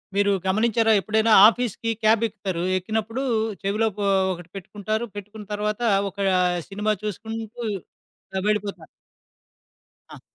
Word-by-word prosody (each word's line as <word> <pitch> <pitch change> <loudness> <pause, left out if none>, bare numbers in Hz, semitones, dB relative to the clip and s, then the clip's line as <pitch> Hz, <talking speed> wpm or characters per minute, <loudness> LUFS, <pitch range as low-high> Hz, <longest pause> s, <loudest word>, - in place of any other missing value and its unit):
మీరు 200 0 +3
గమనించారా, 225 +3 +2
ఎప్పుడైనా 220 +2 +2
ఆఫీస్‌కి 230 -1 0
క్యాబెక్కుతారు. 210 -5 +1
ఎక్కినప్పుడూ 220 +6 -3 0.4
చెవిలో 210 +3 +1
పో 205 - 0 0.3
ఒకటి 175 -1 -11
పెట్టుకుంటారు. 210 +4 -3
పెట్టుకున్న 210 +1 -9
తర్వాతా 210 +3 -2 0.2
ఒకా 200 +1 -5 0.5
సినిమా 210 +2 0
చూసుకుంటూ 225 +3 -5 0.8
ఆహ్, 190 - -2
వెళ్ళిపోతా 210 -1 -1 1.3
ఆ! - - -12
215 Hz, 105 wpm, -24 LUFS, 200-225 Hz, 1.3 s, మీరు